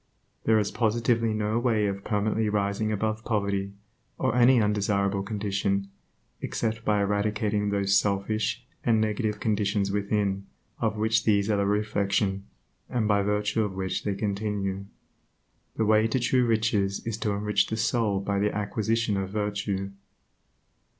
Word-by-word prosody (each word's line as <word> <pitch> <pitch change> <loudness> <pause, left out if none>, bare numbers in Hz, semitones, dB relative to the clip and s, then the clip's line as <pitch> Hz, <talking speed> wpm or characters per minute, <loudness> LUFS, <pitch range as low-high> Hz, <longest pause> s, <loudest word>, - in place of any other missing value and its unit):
There 110 0 +4
is 105 -1 0
positively 115 0 +1
no 110 +1 0
way 115 -4 +1
of 100 -1 -3
permanently 105 +1 0
rising 105 +1 0
above 110 +1 -1
poverty, 100 -3 -1 0.4
or 130 -1 0
any 125 +1 +6
undesirable 100 -2 +1
condition, 100 -1 -1 0.5
except 115 0 -2
by 105 -2 +2
eradicating 105 0 0
those 100 -1 +1
selfish 110 +4 0 0.2
and 115 -2 +3
negative 110 0 -1
conditions 100 -2 0
within, 100 -1 -1 0.3
of 110 -1 0
which 110 +1 +2
these 100 -1 +2
are 105 - +2
the 100 0 +1
reflection, 100 -1 0 0.4
and 115 -4 0
by 100 -1 +3
virtue 105 +2 0
of 100 -3 -4
which 95 -1 -2
they 100 -2 -1
continue. 100 -1 -2 0.9
The 110 - +1
way 110 +1 +4
to 130 +3 0
true 125 0 +2
riches 110 -3 0
is 115 -1 -3
to 105 -2 0
enrich 105 0 +1
the 110 - -3
soul 110 -4 +1
by 100 0 -1
the 105 +1 +1
acquisition 110 +1 -1
of 95 -1 -2
virtue. 100 -1 -2
105 Hz, 145 wpm, -27 LUFS, 100-110 Hz, 0.9 s, any